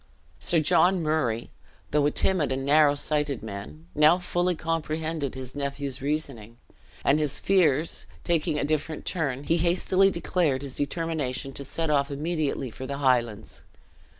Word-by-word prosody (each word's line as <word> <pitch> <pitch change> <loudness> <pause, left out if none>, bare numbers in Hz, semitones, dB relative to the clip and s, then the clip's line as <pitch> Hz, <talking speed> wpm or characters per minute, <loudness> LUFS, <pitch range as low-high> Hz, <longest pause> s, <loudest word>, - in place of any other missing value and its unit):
Sir 170 - +2
John 175 +3 +3
Murray, 135 -8 -1 0.4
though 145 -1 +3
a - - +3
timid 160 -2 +2
and 135 0 -2
narrow 145 0 +5
sighted 150 -2 -1
man, 100 -7 -8
now 150 +3 +5
fully 180 0 0
comprehended 160 -3 -3
his 130 -1 -6
nephew's 140 -2 -4
reasoning; 135 -6 -3 0.5
and 145 +2 +4
his 150 -3 +2
fears 165 -6 +2 0.2
taking 160 -3 0
a - - -1
different 155 +1 -2
turn, 140 -7 -2
he 165 +3 +1
hastily 185 +3 +3
declared 170 -6 0
his 135 -2 -6
determination 145 -3 -2
to 140 - -6
set 160 +3 -2
off 140 -1 +2
immediately 145 -3 -2
for 130 +4 -7
the 140 +1 -4
Highlands. 120 -6 0
150 Hz, 150 wpm, -26 LUFS, 135-165 Hz, 0.5 s, narrow